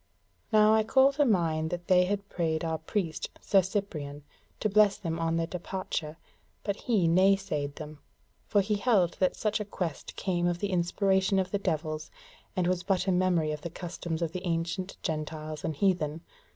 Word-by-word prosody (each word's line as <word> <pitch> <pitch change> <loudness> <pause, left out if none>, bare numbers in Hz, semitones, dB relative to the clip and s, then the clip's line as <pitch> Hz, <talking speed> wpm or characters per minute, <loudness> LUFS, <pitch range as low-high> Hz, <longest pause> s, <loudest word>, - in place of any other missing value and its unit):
Now 215 0 +6
I 220 - +5
call 265 +5 +5
to 290 +1 +3
mind 165 -8 +1
that 175 0 -4
they 180 -1 +5
had 200 +1 -2
prayed 160 -2 -1
our 160 -1 -1
priest, 160 -1 -2
Sir 195 -2 +4
Cyprian, 160 -7 -4 0.4
to - - +1
bless 210 -1 +4
them 165 -3 -3
on 165 0 0
their 165 0 +1
departure, 175 -3 -4 0.5
but 200 - -1
he 210 -6 +1
naysaid 175 -5 +2
them; 155 -2 -9 0.5
for 205 - +3
he 205 +1 0
held 200 -6 +3
that 185 - +2
such 215 0 0
a - - -1
quest 175 -6 -5
came 175 -2 0
of 175 -1 0
the 200 +2 -2
inspiration 190 +2 +2
of 185 -1 0
the 200 - 0
devils, 155 -4 -2 0.5
and 185 - +1
was 180 0 +1
but 190 -1 0
a 190 - +2
memory 180 -4 +2
of 150 -1 -5
the 170 - -5
customs 170 -1 -4
of 165 - -2
the 180 - -5
ancient 175 +3 -2
gentiles 155 -1 -4
and 160 - -2
heathen. 165 -3 +1
180 Hz, 185 wpm, -29 LUFS, 160-195 Hz, 0.5 s, Now